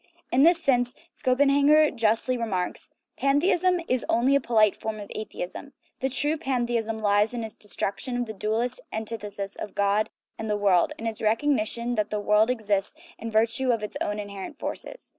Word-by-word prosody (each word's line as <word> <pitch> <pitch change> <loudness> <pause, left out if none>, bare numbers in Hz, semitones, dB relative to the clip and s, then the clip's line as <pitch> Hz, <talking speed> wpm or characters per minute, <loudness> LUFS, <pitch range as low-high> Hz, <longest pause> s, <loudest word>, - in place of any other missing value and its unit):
In 255 - +4
this 335 +3 +6
sense 245 -5 +1 0.2
Schopenhauer 285 +3 +4
justly 230 +1 +1
remarks: 200 -7 -3
" - - -54
Pantheism 350 +6 +3
is 255 -1 +1
only 245 +4 +3
a 280 - +4
polite 215 -4 +3
form 220 -1 -5
of 205 - -9
atheism. 215 +5 -6 0.3
The 265 - 0
truth 290 +3 +1
of 320 - -4
pantheism 235 -5 -1
lies 205 +3 +3
in 235 - -3
its 220 -1 -7
destruction 210 +4 -3
of 245 - -1
the 220 - -6
dualist 225 - -1
antithesis 210 -3 -5
of 210 - -7
God 200 +1 +2 0.3
and 220 - -4
the 210 - +1
world, 195 -4 +3
in 225 - -7
its 225 -1 -3
recog 225 +7 +2
nition 235 +1 -2
that 215 -1 0
the 210 - -2
world 210 +2 +3
exists 210 -2 -1 0.2
in 230 - -5
virtue 230 +4 +1
of 230 -3 -1
its 210 - -5
own 205 - -1
inher 200 -2 -6
ent - - -8
forces. - - -6
225 Hz, 190 wpm, -26 LUFS, 210-255 Hz, 0.3 s, this